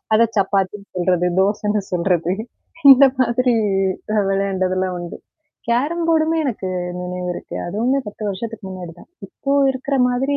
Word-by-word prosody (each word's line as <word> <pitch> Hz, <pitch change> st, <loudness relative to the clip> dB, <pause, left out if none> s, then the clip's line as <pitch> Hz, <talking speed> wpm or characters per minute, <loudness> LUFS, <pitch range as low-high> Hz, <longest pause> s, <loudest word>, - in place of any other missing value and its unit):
அத 220 Hz, +2 st, +5 dB
சப்பாத்தின்னு 200 Hz, 0 st, 0 dB
சொல்றது, 180 Hz, 0 st, +1 dB
தோசன்னு 205 Hz, +1 st, +1 dB
சொல்றது, 175 Hz, -1 st, +1 dB, 0.6 s
இந்த 270 Hz, +1 st, +9 dB
மாதிரி 250 Hz, 0 st, +2 dB, 0.6 s
அ -, -, +1 dB
விளையாண்டதெல்லாம் 185 Hz, -2 st, 0 dB
உண்டு. 175 Hz, -1 st, -7 dB, 0.5 s
கேரம் 290 Hz, +9 st, 0 dB
போர்டுமே 325 Hz, 0 st, +2 dB
எனக்கு 205 Hz, -8 st, -3 dB, 0.3 s
நினைவு 180 Hz, 0 st, -4 dB
இருக்கு, -, -, -8 dB
அதுவுமே 235 Hz, +9 st, 0 dB
10 210 Hz, -, -10 dB
வருஷத்துக்கு 225 Hz, +3 st, -5 dB
முன்னாடி 180 Hz, -3 st, -7 dB
தான். -, -, -17 dB, 0.2 s
இப்போ 280 Hz, -6 st, -4 dB, 0.2 s
இருக்கிற 265 Hz, +2 st, -3 dB
மாதிரி 270 Hz, +3 st, 0 dB
205 Hz, 135 wpm, -20 LUFS, 185-255 Hz, 0.6 s, இந்த